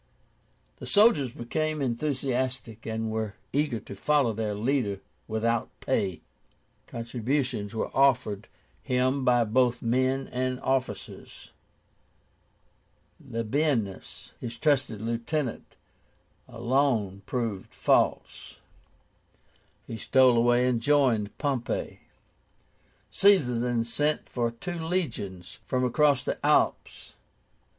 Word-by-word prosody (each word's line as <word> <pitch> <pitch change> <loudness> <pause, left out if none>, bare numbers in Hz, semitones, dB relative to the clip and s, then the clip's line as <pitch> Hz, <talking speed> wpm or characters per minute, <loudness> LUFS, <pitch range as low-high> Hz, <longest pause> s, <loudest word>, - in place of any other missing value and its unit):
The - - -9
soldiers 205 - +4
became 155 +6 -2
enthusiastic, 130 -3 -2
and 110 0 -2
were 110 -2 -3 0.2
eager 145 -4 0
to 100 - -9
follow 140 +2 +2
their 105 -1 -2
leader 110 -3 0 0.3
without 115 +1 0
pay. 95 -3 -1 0.7
Contributions 120 -1 -2
were 110 - -3
offered 120 -6 +2 0.3
him 130 +1 +1
by 120 -2 +4
both 120 +2 +1
men 130 +3 +1
and 130 0 -2
officers. 130 -1 -3 1.7
LABIENUS, 115 -2 -2
his 120 -1 -6
trusted 135 -8 +1
lieutenant, 115 +4 -3 0.7
alone 120 -7 0
proved 115 -7 -3
false. - - 0 1.3
He 115 - -6
stole 130 +2 +4
away, 120 +1 +3
and 120 -2 +1
joined 125 -7 +2
Pompey. 135 -5 -2 1.1
Caesar 160 -13 +4
then 120 -1 0
sent 150 +6 -1
for 120 -2 -1
two 165 +9 -6
legions 110 - -3
from 125 +2 0
across 140 +2 +3
the - - -4
Alps. - - +1
125 Hz, 95 wpm, -27 LUFS, 115-135 Hz, 1.7 s, soldiers